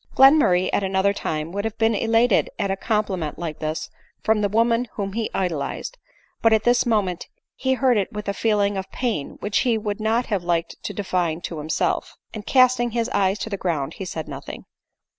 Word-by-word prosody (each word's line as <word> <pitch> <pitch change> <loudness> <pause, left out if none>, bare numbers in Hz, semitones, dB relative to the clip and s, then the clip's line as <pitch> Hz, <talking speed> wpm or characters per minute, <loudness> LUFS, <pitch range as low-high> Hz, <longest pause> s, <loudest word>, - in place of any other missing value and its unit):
Glenmurray 270 -10 +5
at - - +2
another 190 +1 +2
time 155 -4 -3
would 200 +2 -3
have 225 0 -4
been 225 0 +3
elated 225 +1 +3
at 195 - -1
a - - +1
compliment 195 -7 -1
like 160 -3 -5
this 155 +1 -3 0.3
from 220 -1 +2
the 205 - +1
woman 230 +3 +2
whom 195 -2 -4
he 225 0 -2
idol 175 -6 -1
ized; - - -5 0.4
but 225 - +4
at 220 -1 +3
this 245 0 +3
moment 200 -6 0 0.3
he 260 0 0
heard 255 -3 +3
it 200 - -1
with 210 0 -6
a 200 - 0
feeling 205 -1 +1
of 190 0 -5
pain 230 - -3
which 205 0 +1
he 235 -3 +2
would 210 -1 -3
not 225 +3 +1
have 200 -5 -1
liked 170 -1 -1
to - - -2
define 180 -5 -1
to 165 -2 -5
himself, 155 +1 -1 0.2
and 215 -2 -8
casting 255 -2 +4
his 235 +1 -1
eyes 195 -4 +1
to 220 - -5
the 200 - -2
ground 160 -8 -2
he 190 - -4
said 160 -3 -5
nothing. 140 -2 -8
205 Hz, 205 wpm, -23 LUFS, 180-230 Hz, 0.4 s, Glenmurray